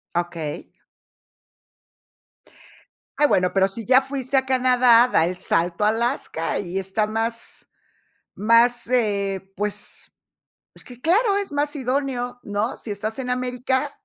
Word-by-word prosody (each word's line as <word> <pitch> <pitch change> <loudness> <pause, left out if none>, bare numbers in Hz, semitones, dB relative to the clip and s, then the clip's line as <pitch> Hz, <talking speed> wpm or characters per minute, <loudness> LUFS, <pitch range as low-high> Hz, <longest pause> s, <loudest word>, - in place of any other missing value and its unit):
Okey. 170 -3 -3 2.5
Ah, 295 - +6
bueno, 185 -9 +2
pero 190 -1 +3
si 195 +4 -7
ya 260 +2 +5
fuiste 270 0 -3
a 265 0 +2
Canadá, 250 -2 +5
da - - +4
el 180 +2 -3
salto 175 +1 0
a - - +4
Alaska 225 - -1
y 185 0 -4
está 195 +3 -1
más 225 +1 -4 0.7
más, 230 +3 +3
eh, 200 -5 -1
pues, 205 +1 -5 0.6
es - - -13
que 245 -1 -13
claro, 400 - +2
es 400 -1 -4
más 290 +1 -1
idóneo, 255 -2 -2
¿no?, 205 +3 -2
si 225 - -9
estás 215 +3 -5
en 255 -1 -3
América, 255 +3 -1
235 Hz, 130 wpm, -23 LUFS, 200-260 Hz, 2.5 s, Ah